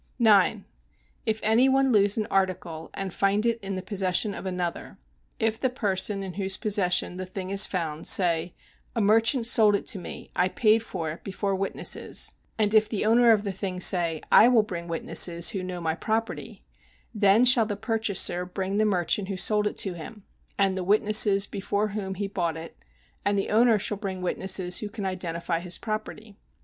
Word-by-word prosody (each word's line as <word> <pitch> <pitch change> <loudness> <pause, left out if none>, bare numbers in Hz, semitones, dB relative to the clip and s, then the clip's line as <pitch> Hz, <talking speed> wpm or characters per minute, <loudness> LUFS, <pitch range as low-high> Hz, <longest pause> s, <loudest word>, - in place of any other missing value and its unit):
9. 215 -3 +3 0.6
If 220 0 -1
any 230 +5 +3
one 270 0 +2
lose 205 -2 +3
an 215 - -1
article, 180 -4 -2
and 195 -2 -5
find 200 +2 0
it 235 0 0
in 195 -1 -5
the 185 - -6
possession 195 +1 0
of 195 - -7
another: 180 -2 -5 0.4
if 225 0 -1
the 260 - 0
person 200 -4 +1
in 190 -2 -7
whose 190 0 +1
possession 180 -4 0
the 185 - -5
thing 185 0 -7
is 200 +1 +6
found 160 -4 -4
say 170 -2 +2 0.4
"A - - -1
merchant 225 +4 +3
sold 220 -3 +4
it - - -4
to 210 - +1
me, 175 - -10
I 180 +1 +1
paid 215 +2 +2
for 170 -8 -5
it 160 - -11
before 195 0 -3
witnesses," 195 +1 -1 0.2
and 210 -1 +1
if 215 -1 +3
the 210 -2 -3
owner 235 +2 +4
of 210 -2 +2
the 200 - -3
thing 190 -1 -5
say 170 -3 +2
"I 225 - +7
will 240 -3 +4
bring 175 -5 -7
witnesses 170 +1 +1
who 200 -5 -4
know 185 -1 -6
my 160 -2 -2
property," 220 +7 -4 0.5
then 210 +2 +3
shall 245 -3 +4
the 205 - -3
purchaser 215 -5 0
bring 190 +2 -4
the 215 - +2
merchant 190 0 0
who 195 -1 -5
sold 210 +2 +2
it - - -6
to 190 - 0
him, 190 +5 -10 0.3
and 195 -1 +1
the 190 - -4
witnesses 205 0 +4
before 205 +1 -3
whom 195 -2 -5
he 200 +2 -4
bought 170 -4 -3
it, 165 +1 -10 0.5
and 205 0 0
the 195 - -2
owner 225 +1 +4
shall 205 +1 -2
bring 190 -3 -6
witnesses 180 0 0
who 210 - -6
can 205 -2 -7
identify 170 -2 -3
his 175 0 -1
property. 215 -1 -7
195 Hz, 190 wpm, -25 LUFS, 185-215 Hz, 0.6 s, I